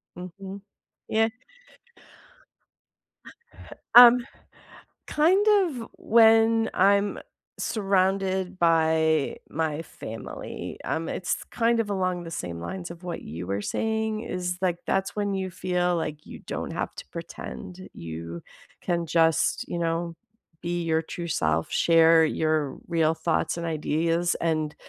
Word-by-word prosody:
Mhm. 190 +2 -8 0.5
Yeah. 225 +1 +2 2.7
Um. 245 0 +10 0.8
Kind 365 +7 +3 0.2
of 250 -9 -6
when 225 0 +5
I'm 200 +2 +3 0.4
surrounded 190 -2 0
by 160 -3 +2
my 160 0 -2
family. 115 -7 -8
Um, 160 +1 -2
it's 175 - -2
kind 230 0 +2
of 205 - -6
along 185 -3 -1
the 165 - -8
same 85 - -5
lines 180 - -6
of 170 +1 -12
what 175 -1 -5
you 85 +4 -7
were 100 +2 -2
saying, 220 - -1
is 180 -3 -3
like 180 -2 +1
that's 195 0 0
when 205 -1 -1
you 190 -1 -3
feel 180 -1 0
like 155 -2 -4
you - - -10
don't - - -4
have - - -4
to - - -8
pretend, 185 +2 -8
you 85 +1 -7 0.4
can 170 -1 -1
just, 165 0 +2
you - - -4
know, 165 0 -2 0.5
be 175 0 -2
your 160 -1 +1
true 170 +1 -6
self, 80 - 0
share 165 -1 +5
your 155 -3 0
real 165 -2 +2
thoughts 165 +1 -1
and 170 - -4
ideas, 165 +2 0
and 155 -2 -1
175 Hz, 125 wpm, -26 LUFS, 160-195 Hz, 2.7 s, Um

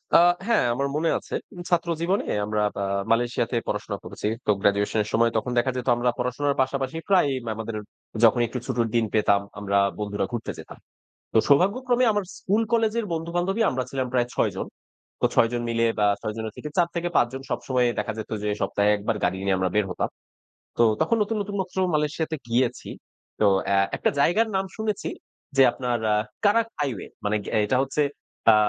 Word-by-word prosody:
আ - - +9 0.3
হ্যাঁ 235 - +3
আমার 140 +3 -1
মনে 160 +2 +1
আছে। - - -12 0.4
ছাত্র 175 -1 +1
জীবনে 185 +4 +1 0.2
আমরা 105 0 -1 0.2
আ - - 0 0.3
মালয়েশিয়াতে 120 +1 +1
পড়াশোনা - - -3
করেছি। - - -5 0.2
তো - - +4
গ্র্যাজুয়েশন 100 +2 +2
এর 105 - -8
সময় 115 +1 +3
তখন 125 +3 -2
দেখা 120 +2 +2
যেত 125 - -4
আমরা 120 +1 +1
পড়াশোনার 130 +3 0
পাশাপাশি 135 +2 -1
প্রায়ই 175 -8 +4 0.2
আমাদের 110 0 -5 0.5
যখন 115 +2 +6
একটু 125 +3 -4
ছুটির 120 -3 0
দিন 115 -1 +3
পেতাম। 100 -2 +3 0.2
আমরা 100 -1 0 0.2
বন্ধুরা 105 -1 -1
ঘুরতে 120 -2 -3
যেতাম। - - -11 0.6
তো - - +4
সৌভাগ্যক্রমে 240 - +3
আমার 205 -1 0
স্কুল 210 +4 +1
কলেজের 225 0 +2
বন্ধু-বান্ধবই 175 +6 -1
আমরা 130 -1 -1
ছিলাম 130 -1 -1
প্রায় 125 -2 +2
৬ - - +2
জন। - - -3 0.5
তো - - +4
৬ 115 - +5
জন 120 - -1
মিলে 115 0 +1
বা 105 - +4
৬ 110 - -3
জনের 110 -1 -4
থেকে 150 - -6
৪ 175 -1 +4
থেকে 175 0 -1
৫ - - +5
জন 135 0 -6
সবসময়ই 125 -2 0
দেখা 110 - -1
যেত 110 - -6
যে 105 - -1
সপ্তাহে 105 +1 +2
একবার 105 +2 -2
গাড়ি 90 +2 0
নিয়ে 95 -1 +2
আমরা 95 0 0
বের 105 -2 +2
হতাম। 90 - -1 0.7
তো - - +5 0.2
তখন 230 - +2
নতুন, 220 +2 -2
নতুন 200 0 -5
মাত্র 190 - -5 0.2
মালয়েশিয়াতে 155 +1 -1
গিয়েছি। 120 +1 0 0.5
তো 105 - +5 0.2
অ্যাঁ 100 0 +3
একটা - - +1
জায়গার 180 +10 +3
নাম 190 - +1
শুনেছি, 215 -2 -2 0.5
যে 135 - +7
আপনার 125 -2 -1
অ্যাঁ 105 0 +3 0.2
কারাক 225 +3 +4
হাইওয়ে 135 -8 -2 0.2
মানে 105 +1 +1 0.2
অ্যাঁ 110 - +3
এটা 130 - +2
হচ্ছে 145 +2 0 0.5
আ - - +6
125 Hz, 190 wpm, -25 LUFS, 110-170 Hz, 0.7 s, আ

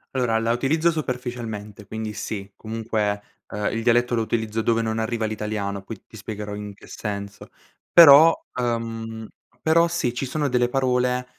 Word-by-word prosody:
Allora, 120 -3 +1
la 115 +1 0
utilizzo 155 +8 +2
superficialmente, 120 -8 -5
quindi 110 0 -5
sì, 100 -1 -5
comunque, 110 -2 -2 0.3
ehm, 105 0 -2
il 115 - -1
dialetto 120 +1 +2
lo 115 - +2
utilizzo 110 0 -1
dove 115 0 +1
non 110 0 -1
arriva 110 0 -1
l'italiano, 105 -2 -3
poi 100 +1 -9
ti - - -16
spiegherò 105 0 -6
in 105 -1 -7
che - - -16
senso. 100 -2 -6 0.4
Però, 160 -1 +9 0.3
uhm, 115 -2 -3 0.4
però 165 +2 +4
sì, 170 -8 -1
ci 130 +2 -3
sono 145 +2 -1
delle 125 -1 +2
parole 125 -1 +1
115 Hz, 160 wpm, -23 LUFS, 105-125 Hz, 0.4 s, Però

